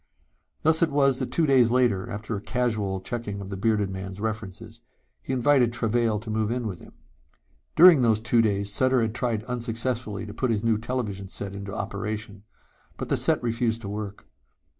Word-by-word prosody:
Thus 160 +2 +4
it 170 - +4
was 140 -2 +3
that 130 - -3
two 165 - +2
days 130 -5 +5
later, 120 -6 +1
after 105 +2 -4
a 100 - -5
casual 110 -6 -1
checking 110 -2 -4
of 100 -1 -7
the - - -3
bearded 105 0 0
man's 95 +1 -6
references, 110 +1 -5 0.4
he - - -6
invited 130 -2 +3
Travail 115 -1 0
to 110 -1 -6
move 110 -1 0
in 120 0 -2
with 95 -5 -4
him. - - -15 0.8
During 170 -4 +8
those 110 -3 +3
two 115 +1 +2
days 100 -2 0
Sutter 130 -2 +2
tried 115 -1 -2
unsuccessfully 115 -2 -3
to 105 - -8
put 130 - -1
his 110 -2 0
new 115 -2 +2
television 110 -5 -3
set 100 0 -6
into 100 0 -6
operation. 105 +1 -5 0.6
But - - -5
the - - +3
set - - +1
refused 115 -1 0
to 100 - -6
work. 105 -1 -6
110 Hz, 185 wpm, -26 LUFS, 100-125 Hz, 0.8 s, During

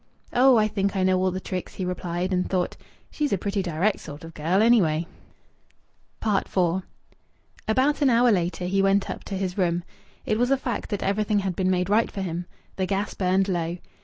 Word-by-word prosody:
"Oh! 255 0 +6
I 215 -1 +4
think 200 -1 -1
I 190 - +1
know 185 0 +3
all 185 - +2
the 185 +1 -3
tricks," 185 -1 -5
he 185 - -3
replied, 180 0 -2
and 180 0 0
thought, 180 -2 -1 0.4
"She's 295 -2 -1
a 200 - +2
pretty 200 +2 -1
direct 180 +3 0
sort 145 +2 -9
of 165 0 -10
girl, 165 +6 +1
anyway!" 175 -9 +3 1.2
IV 200 -2 0 1.1
About 265 +7 +2
an 280 - +5
hour 240 0 +5
later 180 -2 0
he 195 +2 +1
went 195 0 +2
up - - -7
to 195 - -4
his 185 0 -3
room. 175 -1 +1 0.4
It 215 - 0
was 245 +1 +2
a 275 - +3
fact 245 -4 -4
that 205 - -2
everything 210 +1 +1
had 190 -2 -2
been 185 0 +1
made 180 -1 +1
right 215 +3 +3
for 195 - -5
him. 175 0 -4 0.3
The 190 -1 0
gas 200 +2 -1
burned 190 +1 +1
low. 175 -2 -1
190 Hz, 200 wpm, -25 LUFS, 180-215 Hz, 1.2 s, Oh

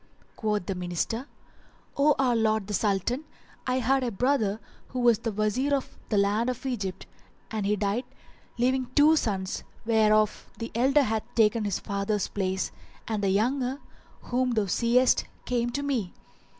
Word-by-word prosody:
Quoth 210 -4 -1
the 195 - -2
Minister, 180 - -3 0.7
"O 290 +1 +4
our 255 -3 +2
lord 220 -2 +2
the 210 - -5
Sultan, 210 - 0 0.4
I 255 - +1
had 260 +2 +2
a 245 - 0
brother 225 -2 +1 0.3
who 255 - -5
was 240 -3 +4
Wazir 225 +6 +1
in 275 - +1 0.3
the 210 - +1
land 205 +4 +2
of 250 +2 -5
Egypt 205 -8 -3 0.5
and 215 -3 -1
he 210 - +2
died, 205 +4 -1 0.5
leaving 255 +1 +1
two 305 +2 +6
sons, 195 -9 -1 0.2
whereof 215 -1 +3
the 230 - -5
elder 270 +5 +4
hath 220 -3 -3
taken 220 -1 +3
his 200 -3 0
father's 200 +1 -2
place 190 -1 -1 0.4
and 215 -2 -2
the 195 - +2
younger, 250 +6 +1 0.5
whom 250 0 0
thou 215 -3 +1
seest, 235 +6 +3 0.2
came 240 -1 0
to 280 +4 -3
me. 250 -10 -1
225 Hz, 155 wpm, -27 LUFS, 205-255 Hz, 0.7 s, two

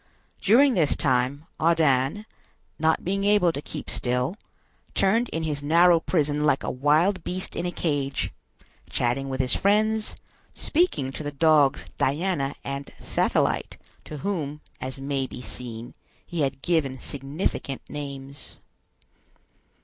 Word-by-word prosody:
During 255 +7 +6
this 160 -9 +3
time, 130 +2 +1
Ardan, 160 +2 +2 0.5
not 160 +1 +2
being 195 +2 0
able 200 -4 +4
to 145 - -5
keep 150 -1 -7
still, 125 +6 -1 0.6
turned 225 +5 +3
in 165 - -3
his 150 -3 -2
narrow 170 +3 +5
prison 150 -3 0
like 145 -2 +2
a - - -1
wild 155 +8 +2
beast 185 +1 -3
in 180 - -1
a - - -2
cage, 145 -5 -1 0.6
chatting 135 +3 0
with 130 0 -3
his 130 -1 +2
friends, 215 +2 +2 0.4
speaking 300 - +1
to 135 - -6
the 145 - -3
dogs 145 -1 +4
Diana 145 -1 0
and 140 0 -5
Satellite, - - 0 0.3
to 150 - -7
whom, 150 -7 -2 0.2
as 130 +1 -4
may 135 -1 -1
be 125 - -9
seen, 120 +1 -7 0.3
he 170 -2 -3
had 135 -1 -1
given 150 -6 +1
significant 140 +1 -3
names. 140 -1 -6
150 Hz, 135 wpm, -25 LUFS, 135-175 Hz, 0.6 s, During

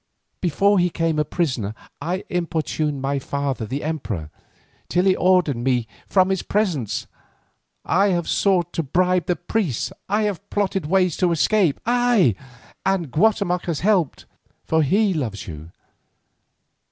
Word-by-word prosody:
Before 195 +4 +3
he 175 - +3
became 165 -2 -1
a - - +3
prisoner 130 - -2 0.3
I 180 +3 -2
importuned 160 -5 -2
my 140 +1 0
father 135 -4 -3
the 140 +6 -4
emperor, 115 - -4 0.6
till 180 +1 +2
he 190 -1 +4
ordered 180 -7 +3
me 120 -1 0 0.2
from 185 -1 +3
his 190 -2 0
presence. 160 - -1 0.8
I 195 +4 +3
have 175 -4 0
sought 180 -4 +1
to - - 0
bribe 180 +3 +1
the 180 - +2
priests, 175 - -2 0.2
I 210 +2 +2
have 200 -1 -3
plotted 195 -5 -1
ways 185 -1 +1
of 180 -2 +3
escape, 170 -1 +2
ay, 240 - +3 0.5
and 185 -7 0
Guatemoc 180 - +1
has 165 -4 -2
helped, 185 -7 +1 0.4
for 160 0 +2
he 195 +7 +2
loves 115 - -3
you. 80 -1 -8
175 Hz, 140 wpm, -22 LUFS, 140-190 Hz, 0.8 s, he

